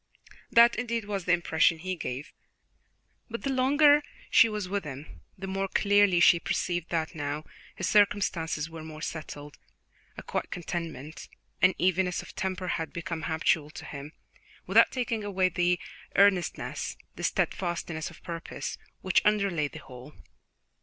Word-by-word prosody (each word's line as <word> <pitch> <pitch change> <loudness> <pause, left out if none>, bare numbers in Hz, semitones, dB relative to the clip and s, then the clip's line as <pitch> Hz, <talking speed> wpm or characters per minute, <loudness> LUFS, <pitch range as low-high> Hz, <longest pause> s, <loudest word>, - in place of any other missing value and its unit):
That, 235 0 +6
indeed, 235 -2 -2
was 200 -3 -3
the 180 - +2
impression 165 -1 +3
he 185 +3 -4
gave; 140 -2 -5 1.0
but 230 +1 -6
the 275 - 0
longer 290 +3 +5 0.3
she 230 - +7
was 210 -3 -3
with 200 +1 -2
him, 145 0 -9 0.2
the 195 - -6
more 195 0 -2
clearly 205 -2 +4
she 175 0 +6
perceived 175 0 -2
that 160 -2 -1
now 145 0 -3 0.3
his - - -2
circumstances 180 -7 +2
were 165 -1 -9
more 155 0 -9
settled 150 -2 -7 0.6
a - - -7
quiet - - -3
contentment, 165 -4 -6 0.3
an 185 0 +5
evenness 185 0 +1
of - - -13
temper, 185 -1 -3
had 160 -2 -2
become 170 -1 -4
habitual 160 -1 +1
to - - -10
him, 145 +2 -8 0.5
without - - +6
taking 235 -4 -2
away 190 -2 +1
the 175 0 +1 0.4
earnestness, 195 -2 +2 0.2
the - - -8
steadfastness 170 -3 -1
of 170 - -16
purpose, 170 -1 -6 0.2
which 185 - +3
underlay 200 -8 +2
the 155 - -11
whole. 130 0 -12
175 Hz, 145 wpm, -28 LUFS, 160-200 Hz, 1.0 s, she